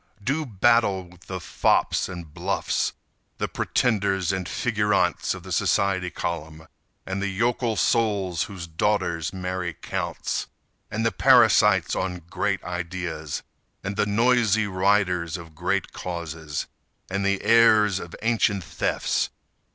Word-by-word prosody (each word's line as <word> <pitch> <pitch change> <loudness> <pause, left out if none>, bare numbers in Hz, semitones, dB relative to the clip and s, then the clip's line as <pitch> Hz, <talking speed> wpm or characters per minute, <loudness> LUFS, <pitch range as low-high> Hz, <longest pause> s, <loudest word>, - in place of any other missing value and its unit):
Do 145 +6 -1
battle 100 -3 +2
with 90 0 -19
the 95 -1 -4
fops 85 - +1
and 85 -4 -8
bluffs, - - -1 0.4
The - - -1
pretenders 100 -6 +1
and 95 -2 -3
figurantes 105 -6 +1
of 95 - -10
the 95 - -9
society 95 0 +1
column 80 -2 -5 0.4
And 95 +1 -3
the 100 - 0
yokel 115 +3 0
souls 100 -8 +1
whose 95 -4 -7
daughters 85 -1 0
marry 90 -2 -3
counts; - - -3 0.4
And 110 +1 -2
the 115 - +3
parasites - - +5
on 90 -2 -3
great - - -1
ideas, 85 -3 -4 0.4
And 100 - -3
the 105 0 +1
noisy 110 -1 +3
riders 95 -3 +1
of 85 -2 -11
great 75 - -1
causes, 80 -4 -5 0.4
And 100 +1 -2
the 100 0 0
heirs 110 -4 +5
of 85 - -8
ancient 110 -4 +2
thefts. - - -1
95 Hz, 130 wpm, -25 LUFS, 85-105 Hz, 0.4 s, parasites